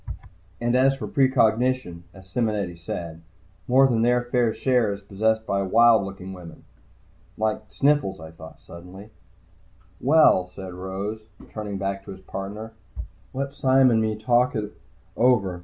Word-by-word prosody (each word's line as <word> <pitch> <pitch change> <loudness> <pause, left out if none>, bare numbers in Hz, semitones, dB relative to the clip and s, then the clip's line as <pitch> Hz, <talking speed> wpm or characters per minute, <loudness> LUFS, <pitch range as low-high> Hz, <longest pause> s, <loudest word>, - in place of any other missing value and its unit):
And 120 +1 0
as 135 +1 +3
for - - -5
precognition, 125 -7 +1
as 95 0 -16
Simonetti 105 -4 -2
said, 85 -1 -7 0.5
more 130 +2 +5
than 120 -4 +1
their 120 +1 +2
fair 120 -1 +1
share 125 -3 +1
is 100 - -5
possessed 110 +3 -1
by 100 -1 0
wild 115 +3 +4
looking 95 -1 -8
women. 90 -3 -12 0.7
Like 110 0 -1
Sniffles, 140 - +1
I 80 0 -10
thought 80 -1 -13
suddenly. 90 +5 -12 0.9
"Well," 135 - +4
Rose 95 +3 -6 0.2
said, - - -18
turning 105 -2 -5
back 100 0 -3
to - - -8
his 95 - -14
partner. 105 +4 -7 0.6
"Let 140 +1 -4
Sime 130 -1 +4
and 110 -1 +3
me 110 -1 -1
talk 120 +4 +1
it 105 -1 -4 0.4
over. 100 -8 +2
110 Hz, 145 wpm, -24 LUFS, 95-125 Hz, 0.9 s, more